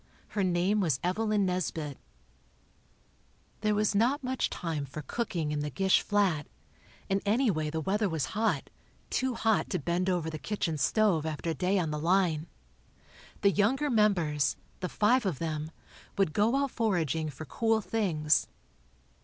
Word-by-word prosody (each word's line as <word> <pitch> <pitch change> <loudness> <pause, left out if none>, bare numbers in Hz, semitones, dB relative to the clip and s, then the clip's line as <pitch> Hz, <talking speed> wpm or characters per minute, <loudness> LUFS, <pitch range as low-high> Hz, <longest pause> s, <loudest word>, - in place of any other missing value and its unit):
Her 205 - -1
name 185 +3 +2
was 160 -10 +1
Evelyn 210 +2 +1
Nesbit. 165 -6 -2 1.6
There 210 0 +1
was 210 0 +2
not 245 +8 +2
much 255 0 -1
time 165 -5 -3
for 145 +2 -7
cooking 170 - -2
in 150 - -1
the 150 0 -2
Gish 190 +6 +3
flat, 195 -8 +1 0.6
and 195 0 0
anyway 205 - +1
the 160 +1 -2
weather 205 +4 0
was 160 -5 -1
hot—too 225 +3 -2
hot 220 -3 +1
to 185 - 0
bend 175 +4 -1
over 175 -3 0
the 155 - -6
kitchen 165 -7 -2
stove 190 +1 +2
after 160 +1 -3
a - - -1
day 185 +6 +1
on 165 -4 0
the 150 - -2
"line." 170 -2 +2 0.9
The 200 - +5
younger 260 +9 +1
members, 175 -10 +2 0.2
the 180 - -3
five 240 +5 +3
of 185 -8 -1
them, 155 -1 -3 0.5
would 195 -6 +2
go 220 +5 +3
out 275 -1 +1
foraging 165 - 0
for 150 +2 -8
cool 225 +8 +1
things. 170 -9 +1
185 Hz, 155 wpm, -29 LUFS, 155-215 Hz, 1.6 s, The